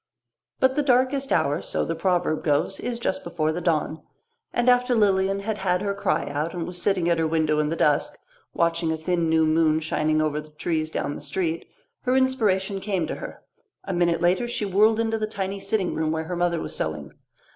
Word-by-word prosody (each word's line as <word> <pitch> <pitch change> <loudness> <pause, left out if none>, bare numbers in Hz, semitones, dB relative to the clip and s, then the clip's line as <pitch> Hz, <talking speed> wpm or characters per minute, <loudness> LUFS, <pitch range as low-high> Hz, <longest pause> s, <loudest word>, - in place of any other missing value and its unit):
But 260 0 +4
the 295 - +2
darkest 265 0 +2
hour, 145 -3 +2
so - - -2
the 165 - -2
proverb 175 -2 0
goes, 150 +5 +1
is 245 -1 -3
just 230 -5 -2
before 160 -2 -1
the 175 - -4
dawn, 160 -2 0 0.5
and 240 +1 0
after 250 0 +4
Lilian 195 -2 +2
had 215 +1 -3
had 180 0 0
her 200 -1 0
cry 200 - -1
out 150 +4 -3
and 170 -2 -3
was 180 0 -6
sitting 185 -4 +1
at 170 -1 +2
her 160 - +2
window 155 -1 +1
in 150 0 +1
the 165 - -1
dusk, 150 -3 +1 0.3
watching 170 -1 +1
a 160 - -1
thin 170 +1 0
new 160 0 +3
moon 155 0 +3
shining 155 0 0
over 155 -1 0
the 155 - -15
trees 155 +1 -2
down 145 - -2
the - - -8
street, 165 +3 -2 0.3
her 255 +1 +1
inspiration 210 -7 +1
came 190 -5 -1
to - - -4
her. - - -9 0.4
A 195 - -4
minute 175 -1 +1
later 180 +7 +2
she 235 -3 -2
whirled 210 +3 +3
into 225 -1 0
the 215 - -1
tiny 200 -2 -4
sitting 195 -2 -1
room 155 -1 -1
where 160 0 -1
her 175 +3 -4
mother 175 -1 +1
was - - -5
sewing. 75 -2 -3
175 Hz, 210 wpm, -24 LUFS, 160-200 Hz, 0.5 s, But